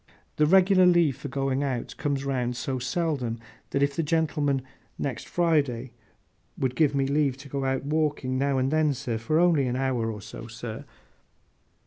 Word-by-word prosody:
The 150 - +4
regular 185 +1 +6
leave 170 -6 +4
for - - -6
going 135 0 -1
out, 130 -4 -3
comes 140 -2 -1
round 125 -3 -1
so 130 0 -2
seldom, 130 -3 -1 0.3
that 140 - +1
if 140 0 0
the - - +1
gentlemen, 150 -4 0 0.3
next 135 -3 -4
Friday, 140 -8 +1 0.7
would 130 -1 -1
give 145 -3 +3
me 135 -1 +2
leave 140 -1 +1
to 140 +1 -12
go 135 0 -2
out 135 0 0
walking, 150 -3 0
now 135 +1 +1
and 130 +1 +1
then—for 145 -3 0
only 165 -6 +4
an 125 - -1
hour 125 -4 0
or 105 - -7
so, 110 +3 -9
sir! 115 -1 -7
140 Hz, 165 wpm, -26 LUFS, 125-150 Hz, 0.7 s, regular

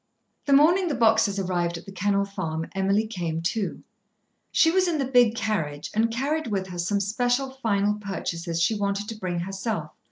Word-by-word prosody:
The 280 - +4
morning 340 +7 +5
the 300 - -1
boxes 220 -3 +3
arrived 175 -3 -1
at - - -11
The 195 - -9
Kennel 200 +1 +1
Farm, 165 -5 -4
Emily 195 +3 +1
came 175 -7 -3
too. 195 +5 -2 0.7
She 325 - +4
was 370 +1 +3
in 335 -3 0
the 275 - 0
big 245 -3 +4
carriage, 165 -11 -2
and 225 +2 +2
carried 280 +6 -1
with 195 -4 -1
her 175 -1 -6
some 200 +4 0
special 245 +6 0
final 210 -6 0
purchases 170 -4 -4
she 170 +6 +3
wanted 200 0 -1
to 225 - -5
bring 180 -4 -3
herself. 190 -3 -3
205 Hz, 185 wpm, -25 LUFS, 185-235 Hz, 0.7 s, morning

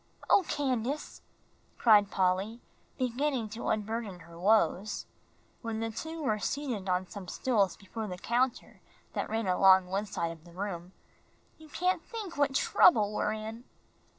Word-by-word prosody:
"Oh, 395 - +6
Candace," 270 0 -2 0.6
cried 210 -4 +6
Polly, 190 +5 0 0.4
beginning 255 -1 -1
to 225 +3 -6
unburden 215 -3 -2
her 170 0 -14
woes, 205 0 +2 0.6
when 225 -2 -3
the 225 0 -2
two 320 +7 -6
were 215 -5 +1
seated 235 -6 -3
on 180 +1 +1
some 200 -3 -9
stools 200 -3 +1
before 215 +2 -6
the 180 -2 -5
counter 245 +5 -1 0.3
that - - -2
ran 225 0 -1
along 190 0 +6
one 195 +3 -2
side 170 -3 -2
of 160 -1 -12
the 170 0 -15
room, 180 -2 -5 0.7
"you 315 -1 -14
can't 365 +4 0
think 430 -7 -7
what 285 -1 +1
trouble 215 - +5
we're - - 0
in." 220 +2 -6
215 Hz, 150 wpm, -30 LUFS, 190-250 Hz, 0.7 s, Oh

